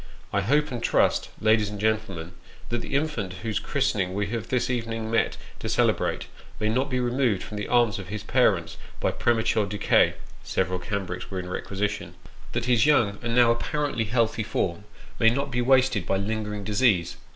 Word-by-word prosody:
I 100 - +2
hope 145 - +2
and 120 -2 -4
trust, - - +2
ladies 110 -1 +3
and 105 -1 -7
gentlemen, 105 -6 -1 0.4
that 120 0 -1
the 135 - -4
infant 140 -11 -1
whose 110 -3 -1
christening 105 -10 -1
we 105 0 0
have 115 -2 -3
this 125 -1 0
evening 115 -2 -3
met 115 - +1 0.2
to - - -4
celebrate, - - +1 0.3
may 110 - +1
not 130 +5 0
be 130 -1 0
removed 120 -4 +1
from 105 - -7
the 105 - -3
arms 120 -5 +3
of 95 - -8
his 105 +2 -5
parents 105 -8 +2 0.2
by - - +1
premature 110 -3 +1
decay 105 +1 +3 0.3
(several 90 0 -1
cambrics 90 -1 -4
were 95 - -3
in 90 0 -6
requisition): 105 +2 -3 0.4
that 120 - -1
his 125 +2 +3
young 110 -9 +3
and 115 0 -2
now 120 -1 +6
apparently 140 0 -1
healthy 115 0 +1
form, 100 -3 -2 0.3
may 115 - +6
not 140 +3 -2
be 125 0 0
wasted 130 -6 +3
by 95 - +1
linger 105 +2 -2
ing 105 - -6
disease. 105 -4 +2
110 Hz, 185 wpm, -26 LUFS, 100-125 Hz, 0.4 s, now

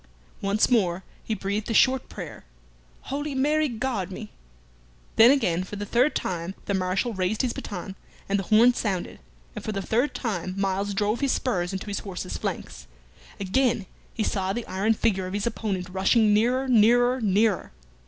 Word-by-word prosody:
Once 200 +2 +2
more 190 -6 +2 0.2
he 220 - -2
breathed 200 +2 -3
a 225 - 0
short 260 +2 +3
prayer, - - -8 0.7
"Holy 290 0 -3
Mary, 300 +3 +2
guard 230 -6 -2
me!" 210 +3 -8 0.8
Then 225 +2 +8
again, 185 -11 +2
for 190 - -8
the 205 0 -4
third 250 +8 +2
time, 175 +1 -3
the 200 - -1
Marshal 190 +5 0
raised 190 +4 0
his 245 - 0
baton, 190 0 -6 0.3
and 200 0 +1
the - - -2
horn 230 +5 +6
sounded, 195 -7 -3 0.4
and - - -6
for - - -3
the 200 - -2
third 245 +9 0
time 185 -6 -3
Myles 195 +1 -1
drove 210 +3 0
his 275 -2 +1
spurs 180 -8 -1
into 190 -1 -4
his 205 -1 -3
horse's 185 -2 -6
flanks. - - -5 0.5
Again 210 +2 +1 0.3
he 220 - -2
saw 190 -2 -1
the 240 +1 -4
iron 205 +4 +1
figure 190 -4 0
of 185 - -6
his 205 0 -1
opponent 205 -5 -2
rushing 205 +4 +3
nearer, 250 +5 +2
nearer, 245 +2 +4
nearer. 210 -1 +2
210 Hz, 175 wpm, -25 LUFS, 190-240 Hz, 0.8 s, Then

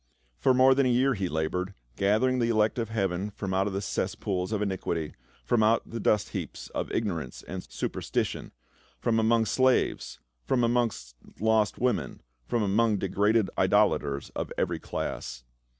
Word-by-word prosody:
For 130 - +4
more 130 +1 +6
than 135 0 +2
a - - +2
year 130 +3 +3
he 95 -5 -2
labored, 90 +5 -2 0.2
gathering 110 +6 +2
the 115 -1 +1
elect 110 +1 +2
of 115 -2 -2
heaven 100 -3 -1
from 100 -1 -5
out 95 +2 +1
the 95 +1 -2
cesspools 95 -1 -2
of 110 - 0
iniquity, 95 -6 -2 0.3
from 120 -2 +2
out 110 +2 +3
the 115 - -5
dust 105 -2 +2
heaps - - -6
of - - -4
ignorance 85 - -3
and 95 0 -5
superstition; - - -3 0.5
from 115 - +1
among 115 0 +3
slaves, 130 +4 +1 0.2
from 120 - +1
among 120 0 +3 0.5
lost 110 -1 +2
women, 110 - -1 0.2
from 115 -2 0
among 105 +2 +2
degraded 100 +2 +1
idolaters 70 -1 +2
of - - -4
every - - 0
class. - - -5
105 Hz, 155 wpm, -28 LUFS, 95-115 Hz, 0.5 s, more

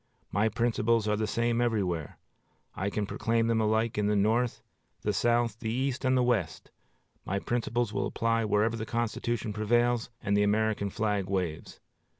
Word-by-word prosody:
My 105 +3 +2
principles 115 0 +1
are 105 - +2
the 110 0 -1
same 115 +1 +1
everywhere. 95 -10 -1 0.6
I 95 +2 -2
can 105 0 -2
proclaim 115 +3 0
them 115 -1 +2
alike 110 0 +1
in 105 - +1
the 105 - +2
North, 115 +4 +1 0.4
the 105 - 0
South, 120 0 +1
the 110 - -3
East, 130 +2 -1
and 130 -1 +3
the 125 - +3
West. 110 -10 -1 0.5
My 100 - -2
principles 120 +2 -1
will - - 0
apply 115 0 0
wherever 105 +2 +2
the 110 -1 -5
Constitution 115 -1 -2
prevails 120 +3 +1
and 100 -1 0
the 105 - +3
American 105 0 +1
flag 105 -2 -1
waves. 90 -5 -3
110 Hz, 165 wpm, -29 LUFS, 105-120 Hz, 0.6 s, and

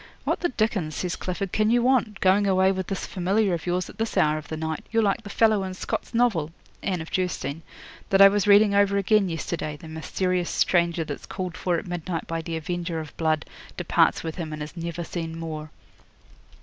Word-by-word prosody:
'"What - - 0
the 350 - 0
dickens," 215 - -1
says 180 -1 -2
Clifford, 185 +1 -4
"can 215 0 +2
you 240 +1 +3
want, 245 -5 +2
going 195 +2 +4
away 190 0 +4
with 190 -1 -3
this 195 - -3
familiar 195 +2 +1
of 170 +1 -4
yours 180 +1 0
at - - -13
this 225 0 -2
hour 155 0 +3
of 150 - -12
the 160 - -5
night? 160 0 -3
You're 225 -1 +3
like 200 -2 +1
the 205 - -10
fellow 215 -2 +3
in 185 -1 -5
Scott's - - -4
novel 230 -11 +2 0.3
['Anne 185 -4 -1
of 160 - -9
Geierstein') 180 -5 -2 0.5
that 195 - +3
I 195 - +11
was 205 0 +1
reading 205 0 +6
over 200 0 +3
again 200 0 +3
yesterday 165 -2 -3
the 160 - -12
mysterious 175 +3 -1
stranger 170 -2 +2
that's 145 -2 -7
called 185 -2 -4
for 175 -2 0
at - - -5
midnight 175 -1 -4
by 165 0 -3
the 165 0 -4
Avenger 170 +1 -3
of 155 -2 -8
Blood, 155 -2 0 0.3
departs - - +2
with 160 -1 -5
him 165 -3 -4
and 155 -1 -4
is 150 - -9
never 170 0 -4
seen 165 -1 -5
more." 155 -2 -5
180 Hz, 215 wpm, -25 LUFS, 160-200 Hz, 0.5 s, I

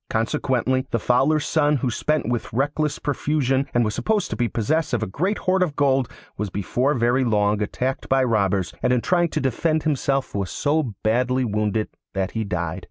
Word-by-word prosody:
Consequently, 130 +3 0
the - - 0
Fowler's 135 +7 +2
son, 150 -2 +2
who 130 -2 -1
spent 150 +6 0
with 120 -1 -2
reckless 145 +4 0
profusion 140 -2 0
and 120 -1 +2
was 105 - -1
supposed 210 - 0
to - - -1
be 120 - 0
possessed 150 +6 0
of 115 - -1
a - - 0
great 185 - -1
hoard 185 0 +1
of 165 -6 0
gold, 135 -3 +2 0.3
was 105 -1 -2
before 120 +9 0
very 120 +2 +2
long 105 -3 +1
attacked 130 +5 -2
by 135 0 +3
robbers, 100 -6 +1
and 125 - +2
in 125 - +2
trying 175 +2 +2
to 155 - -2
defend 155 +4 0
himself 140 -3 0
was 100 -3 -2
so 145 - 0
badly 125 +3 +1
wounded 105 0 0 0.3
that 95 -1 -1
he 110 - -2
died. 85 -5 -3
130 Hz, 190 wpm, -23 LUFS, 110-145 Hz, 0.3 s, by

